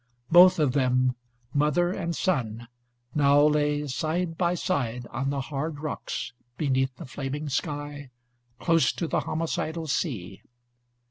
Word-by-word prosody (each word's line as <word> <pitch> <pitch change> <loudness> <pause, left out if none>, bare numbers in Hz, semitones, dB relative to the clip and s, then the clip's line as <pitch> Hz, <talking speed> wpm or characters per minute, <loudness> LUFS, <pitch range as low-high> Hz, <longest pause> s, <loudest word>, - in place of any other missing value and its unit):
Both 180 +2 +8
of 150 -5 +2
them, 130 -1 +2 0.4
mother 150 +5 +2
and 170 -3 -3
son, 120 -9 -1 0.5
now 145 -1 +4
lay 150 -1 +2
side 165 +5 -2
by 175 +1 +1
side, 125 -10 -1
on 135 +1 -2
the 140 -1 -1
hard 145 +2 -4
rocks, 150 -5 -4 0.2
beneath 130 -3 0
the 165 - -9
flaming 140 +2 -4
sky, 145 -1 -3 0.5
close 165 +1 +3
to 170 - -3
the - - +1
homicidal 160 0 -2
sea. 115 - -3
145 Hz, 130 wpm, -27 LUFS, 130-165 Hz, 0.5 s, Both